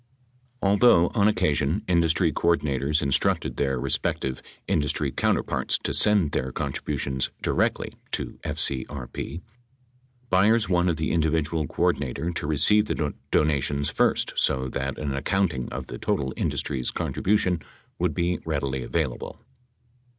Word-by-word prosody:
Although 100 -3 +5
on 105 -3 +4
occasion 80 -4 +1
industry 85 -2 +2
coordinators 75 -3 +1
instructed 70 -1 +1
their 65 -2 0
respective 65 0 -1 0.3
industry 75 -1 0
counterparts - - 0
to - - -3
send 100 -8 +3
their 65 0 -2
con - - -3
tributions 65 -2 -2
directly - - 0 0.2
to - - -3
FCRP, 70 +3 -3 0.9
Byers 105 +5 +4
wanted 85 -2 +2
the 80 - -1
individual 80 -1 0
coordinator 70 +7 -1
to 80 - -4
receive 90 +8 +4
the 75 -8 -1 0.2
donations 70 -1 +1
first - - +1
so 65 0 +2
that 70 +1 -3
an 70 -2 -3
accounting 80 -2 0
of - - -5
the - - -8
total 65 -1 -1
indus - - 0
try's 65 -4 -3
contribution 90 -4 0 0.4
would - - 0
be 90 +1 0
readily 70 -4 -2
available. 70 -2 -3
75 Hz, 125 wpm, -25 LUFS, 70-85 Hz, 0.9 s, Although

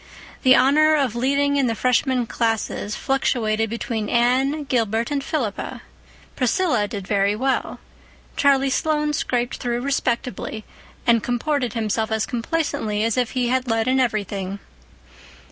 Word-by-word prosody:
The 260 -1 +6
honor 305 +4 +5
of 270 -6 0
leading 280 +3 +1
in 270 -2 +2
the 230 - -1
Freshman 250 +1 +1
classes 225 -2 -2
fluctuated 225 -5 0
between 225 -2 -3
Anne, 260 +5 +2
Gilbert 230 -2 0
and 280 -1 -1
Philippa; 255 -9 -3 0.5
Priscilla 250 - +1
did 200 -2 -6
very 200 0 +2
well; 265 +4 -1 0.6
Charlie 275 -3 +3
Sloane 300 +1 0
scraped 245 -4 -1
through 240 0 -2
respectably, 245 -4 -2 0.4
and 235 -2 +4
comported 250 +1 -1
himself 220 0 -1
as 220 0 0
complacently 230 -5 -2
as 225 -1 +1
if 245 -3 0
he 250 -2 0
had 260 0 0
led 225 0 0
in 260 +1 +3
everything. 200 -5 -1
245 Hz, 135 wpm, -22 LUFS, 225-270 Hz, 0.6 s, The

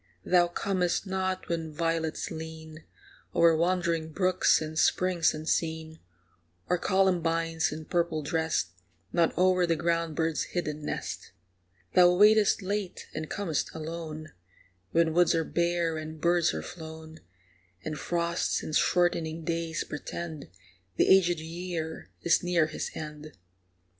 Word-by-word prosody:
Thou 175 -1 +4
comest 180 +1 -1
not 190 -1 -2
when 165 -2 -3
violets 165 0 -2
lean 160 -1 -8 0.5
O'er 165 -1 +5
wandering 170 -1 0
brooks 185 +2 +3
and 155 0 -4
springs 185 -3 +3
unseen, 160 0 -2 0.7
Or 180 0 +1
columbines, 165 -4 +1
in 155 +1 -6
purple 170 -3 0
dressed, 160 - 0 0.4
Nod 170 -1 +3
o'er 185 0 +3
the 165 - +2
ground 165 -1 0
bird's 160 0 0 0.2
hidden 150 -3 -2
nest. - - -5 0.6
Thou 180 0 +6
waitest 210 +1 +5
late 200 -1 -3
and 155 0 -5
com'st 175 -7 -2
alone, 160 -1 -6 0.6
When 165 -1 +3
woods 175 0 +4
are 165 - +1
bare 170 0 0
and 155 0 -7
birds 170 +1 +3
are 80 - -4
flown, 160 - -9 0.7
And 155 - -3
frosts 170 +2 -1
and 155 - -3
shortening 165 -2 +1
days 165 -1 -2
portend 155 0 -6 0.5
The - - +3
aged 175 -3 +2
year 165 0 -5
is 170 - +4
near 175 -2 +2
his 155 - -4
end. 150 -1 -7
165 Hz, 130 wpm, -28 LUFS, 160-175 Hz, 0.7 s, Thou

